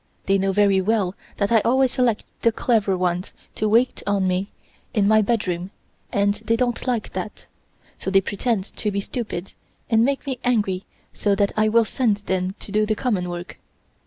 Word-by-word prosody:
They 195 0 +3
know 195 0 +1
very 200 -1 +3
well 200 -2 +1 0.2
that 200 +1 0
I 230 - +6
always 260 +3 +3
select 245 -5 +1 0.2
the 230 - +4
clever 215 -5 +1
ones 180 0 -1 0.2
to 215 - -1
wait 235 +4 +3
on 200 -2 +2
me 185 +2 0 0.5
in 205 -2 +3
my 215 +1 +5
bedroom 195 -5 -1 0.4
and 200 0 +2
they 225 +2 -1
don't 245 +1 -1
like 240 -4 -1
that, - - -6 0.5
so - - -3
they 195 0 +5
pretend 205 +1 -2
to 210 - 0
be 200 -1 -1
stupid 200 -4 -5 0.4
and 225 0 +5
make 275 +3 0
me 265 -3 -3
angry 205 -6 +1 0.3
so 205 -1 +1
that 200 0 +1
I 215 0 +3
will 230 +1 +4
send 215 -1 +1
them 190 -2 -2
to - - -6
do 215 +1 +2
the 215 - +1
common 205 -8 -1
work. 175 0 -7
205 Hz, 190 wpm, -23 LUFS, 195-230 Hz, 0.5 s, I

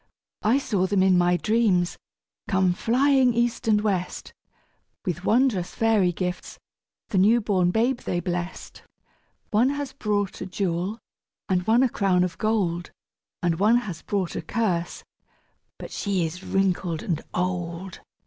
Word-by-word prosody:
I 225 +5 +3
saw 200 -9 0
them 195 -1 +2
in 190 -1 +4
my 175 0 +3
dreams 210 -5 +1 0.5
come 190 -3 +2
flying 255 +4 +3
east 235 -1 0
and 215 -1 +4
west, 190 -4 -2 0.7
With 180 0 -3
wondrous 225 -7 +2
fairy 220 -5 +3
gifts 180 +1 -4 0.5
the 190 - +1
new 220 +5 +5
born 190 -5 +1
babe 235 +6 +1
they 175 - -2
bless'd; 175 0 -5 0.7
One 230 +5 +3
has 285 -1 -4
brought 205 -6 -2
a 185 - -4
jewel 185 +2 -2 0.5
and 180 -1 0
one 235 +3 +5
a - - +4
crown 185 -4 +2
of 180 -1 -4
gold, 190 -6 0 0.5
And 170 -1 +1
one 215 +4 +5
has 190 -10 -4
brought 195 -4 -2
a - - -2
curse 180 -7 -2 0.7
but - - -9
she 195 -4 -1
is 175 +4 -6
wrinkled 185 -4 0
and 165 -4 -2
old. 180 0 -3
190 Hz, 145 wpm, -25 LUFS, 180-225 Hz, 0.7 s, new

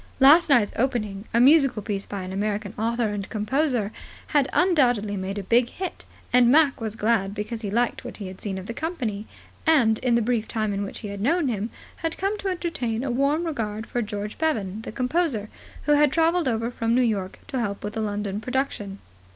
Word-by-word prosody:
Last 300 +5 +7
night's 240 -7 +4
opening, 215 -5 -1
a 235 - +2
musical 275 -4 +5
piece 200 -2 -3
by 200 -2 -5
an 185 - -6
American 205 +1 -2
author 230 +1 0
and 205 -2 -4
composer, 230 0 0 0.4
had 290 -3 +2
undoubtedly 245 - +2
made 195 +1 -4
a 200 - -3
big 240 +5 +3
hit, 370 +5 -6 0.3
and 245 -1 +6
Mac 290 -3 +4
was 220 -1 -3
glad, 210 -3 +1
because 220 +2 -4
he 205 - -3
liked 235 +4 0
what - - -8
he 205 - -6
had 185 0 -9
seen 195 -2 -3
of 190 - -6
the 230 - -5
company, 235 - -3 0.4
and, 240 -9 +4
in 250 -2 +2
the 235 - +2
brief 230 -1 0
time 215 -2 -1
in 200 - -2
which 200 - -6
he 210 - -5
had 200 0 -6
known 305 - +2
him, 215 -1 -2 0.3
had 325 0 -3
come 390 +3 0
to 400 - -3
entertain 295 -11 -2
a 270 - -1
warm 280 +6 +1
regard 220 -8 -3
for 240 - -2
George 210 -1 -5
Bevan, 220 -11 -1
the - - -7
composer, 250 -3 0 0.3
who 295 - +1
had 295 -1 +5
travelled 330 0 +2
over 230 0 0
from 230 -1 0
New 255 - +4
York 200 -5 -1
to 265 -3 -2
help 200 -4 -3
with 210 +1 -4
the 220 - -2
London 205 -1 -2
production. 235 -5 -2
230 Hz, 210 wpm, -25 LUFS, 205-275 Hz, 0.4 s, Last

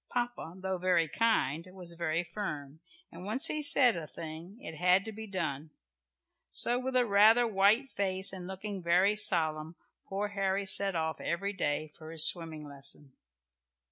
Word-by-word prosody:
Papa, 240 -8 -4
though 190 -1 -3
very 175 -2 +2
kind, 165 - 0
was 180 -3 -6
very 170 0 -2
firm, 155 -6 -7 0.3
and 170 +2 -11
once 225 +10 0
he 305 -1 +2
said 260 -5 +5
a 165 -3 -6
thing, 165 +6 -9
it 165 - -9
had 180 +3 +3
to 220 - -6
be 220 +1 -9
done. 160 -6 -4 0.8
So 245 +1 +1
with 260 0 -4
a 250 -1 +3
rather 220 +3 +5
white 220 +5 +2
face, 190 -1 0
and 180 -2 -7
looking 190 +1 -6
very 180 +4 +3
solemn, 160 -5 +2 0.3
poor 200 +2 -3
Harry 195 0 -1
set 195 0 +1
off 160 -2 -3
every 200 +4 -2
day 155 -4 -2
for 155 -1 -12
his 160 -1 +6
swimming 160 -3 +2
lesson. 140 0 -5
185 Hz, 165 wpm, -30 LUFS, 160-205 Hz, 0.8 s, his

